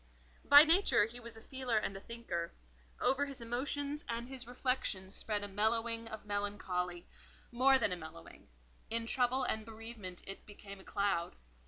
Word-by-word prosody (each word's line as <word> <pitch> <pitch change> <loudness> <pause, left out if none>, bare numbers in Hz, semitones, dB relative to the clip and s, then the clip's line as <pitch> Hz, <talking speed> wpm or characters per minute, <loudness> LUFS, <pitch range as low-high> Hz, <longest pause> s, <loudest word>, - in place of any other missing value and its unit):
By 285 +1 +10
nature 330 - +5
he 235 +3 -8
was 230 -1 -9
a - - -11
feeler 260 -3 -2
and 200 -2 -1
a - - -5
thinker; 230 -8 -4 0.5
over 285 +2 +2
his 275 -1 -7
emotions 280 +5 -2
and 235 +1 -2
his 260 -3 -6
reflections 245 -7 -1
spread 210 -2 -1
a - - -2
mellowing 225 +3 +1
of 220 -2 -7
melancholy; 190 -4 -2 0.5
more 265 +3 +5
than 235 - +1
a - - +2
mellowing: 160 - -11 0.4
in 230 0 0
trouble 255 +2 +2
and 220 -3 -1
bereavement 220 -4 -8
it 195 - -8
became 200 -1 -11
a - - -13
cloud. 195 -4 0
225 Hz, 165 wpm, -34 LUFS, 200-250 Hz, 0.5 s, By